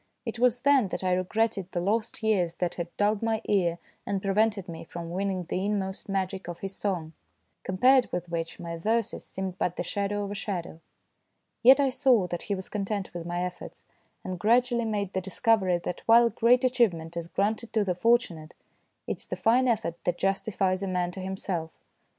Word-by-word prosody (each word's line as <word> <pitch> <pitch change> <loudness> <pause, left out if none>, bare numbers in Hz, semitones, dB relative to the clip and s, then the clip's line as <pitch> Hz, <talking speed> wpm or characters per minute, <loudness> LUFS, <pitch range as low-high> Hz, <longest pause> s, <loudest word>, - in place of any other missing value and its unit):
It 230 0 -4
was 245 0 +3
then 275 -5 +4
that 190 - -5
I 185 -1 +2
regretted 195 +1 0
the 175 - -1
lost 215 +5 -1
years 185 -6 +1
that 180 -2 -1
had 170 -1 -4
dulled 205 0 +2
my 225 -1 0
ear 175 -4 +1 0.3
and 200 -1 -2
prevented 205 0 +1
me 165 -2 -7
from 170 0 -7
winning 190 0 -1
the 180 +2 -3
inmost 200 -1 -2
magic 190 -1 -2
of 175 -1 -7
his 195 0 -5
song, 175 -6 -3 0.5
compared 250 +7 +3
with 180 0 -3
which 165 -1 -4
my 170 -1 -5
verses 220 +5 -1
seemed 190 -1 -5
but 180 - 0
the - - -2
shadow 200 +3 -2
of 200 - -5
a - - -2
shadow. 185 -6 -4 0.8
Yet 265 +4 +8
I 275 -2 +3
saw 255 -6 +3
that 175 - -3
he 200 - -2
was 190 0 -7
content 200 -1 -3
with 170 -1 -6
my 175 +1 -2
efforts, 180 0 -7 0.4
and 185 -1 -5
gradually 235 +3 +3
made 205 -3 -2
the 190 - -1
discovery 190 -1 +2
that 175 0 -5
while 235 +1 +7
great 245 +3 +4
achievement 195 -11 +1
is 170 -1 -4
granted 215 +5 -1
to 220 -2 +3
the 185 - +1
fortu 230 +4 +3
nate, 155 +1 -12 0.5
it - - -3
is - - -14
the - - -3
fine 250 +3 +3
effort 210 -8 -1
that 175 0 0
justifies 195 -1 0
a 195 - -2
man 180 -1 -1
to 190 - -8
himself. 185 -3 -4
195 Hz, 195 wpm, -27 LUFS, 180-225 Hz, 0.8 s, Yet